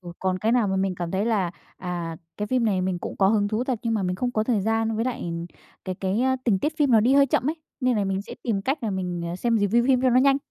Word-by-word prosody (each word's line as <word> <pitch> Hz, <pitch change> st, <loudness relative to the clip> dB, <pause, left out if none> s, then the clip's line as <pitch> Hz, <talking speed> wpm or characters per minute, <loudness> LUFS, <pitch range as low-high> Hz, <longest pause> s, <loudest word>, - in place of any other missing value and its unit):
Ừ, 175 Hz, -2 st, -9 dB
còn 185 Hz, -1 st, -1 dB
cái 220 Hz, +4 st, +1 dB
nào 235 Hz, -5 st, +3 dB
mà 190 Hz, -, 0 dB
mình 190 Hz, -1 st, 0 dB
cảm 175 Hz, -1 st, -4 dB
thấy 195 Hz, +2 st, 0 dB
là, 210 Hz, -6 st, +1 dB, 0.3 s
à, 175 Hz, -2 st, -4 dB, 0.2 s
cái 210 Hz, -, -3 dB
phim 250 Hz, 0 st, +1 dB
này 195 Hz, -4 st, +1 dB
mình 185 Hz, -1 st, -1 dB
cũng -, -, -6 dB
có 190 Hz, -1 st, +4 dB
hứng 205 Hz, -1 st, +2 dB
thú 220 Hz, +4 st, -1 dB
thật, 255 Hz, -4 st, -1 dB
nhưng 230 Hz, -1 st, 0 dB
mà 210 Hz, -, 0 dB
mình 180 Hz, 0 st, -1 dB
không 245 Hz, +5 st, -1 dB
có 215 Hz, -, 0 dB
thời 220 Hz, -4 st, +1 dB
gian 225 Hz, +1 st, 0 dB
với 225 Hz, -, 0 dB
lại, 255 Hz, -, -3 dB
ừm, 170 Hz, 0 st, -4 dB, 0.4 s
cái 185 Hz, -, -3 dB
cái, 190 Hz, +4 st, -1 dB
a, 260 Hz, 0 st, +2 dB
tình 210 Hz, -6 st, +3 dB
tiết 310 Hz, +8 st, -2 dB
phim 290 Hz, -4 st, +2 dB
nó 225 Hz, -, +6 dB
đi 245 Hz, +5 st, +3 dB
hơi 280 Hz, 0 st, +6 dB
chậm 260 Hz, +2 st, +1 dB
ấy, 325 Hz, -, -5 dB, 0.2 s
nên 250 Hz, -3 st, +2 dB
là 205 Hz, -, +1 dB
mình 195 Hz, 0 st, -1 dB
sẽ -, -, -9 dB
tìm 205 Hz, -5 st, -1 dB
cách 270 Hz, +3 st, -1 dB
là 220 Hz, -, -1 dB
mình, 180 Hz, -2 st, -3 dB
ờ, 175 Hz, -, -4 dB
xem 230 Hz, +3 st, +1 dB
review 220 Hz, +4 st, +2 dB
phim 260 Hz, -2 st, +4 dB
cho 255 Hz, -, +4 dB
nó 250 Hz, +1 st, +5 dB
nhanh. 275 Hz, 0 st, +4 dB
215 Hz, 315 wpm, -25 LUFS, 190-245 Hz, 0.4 s, nó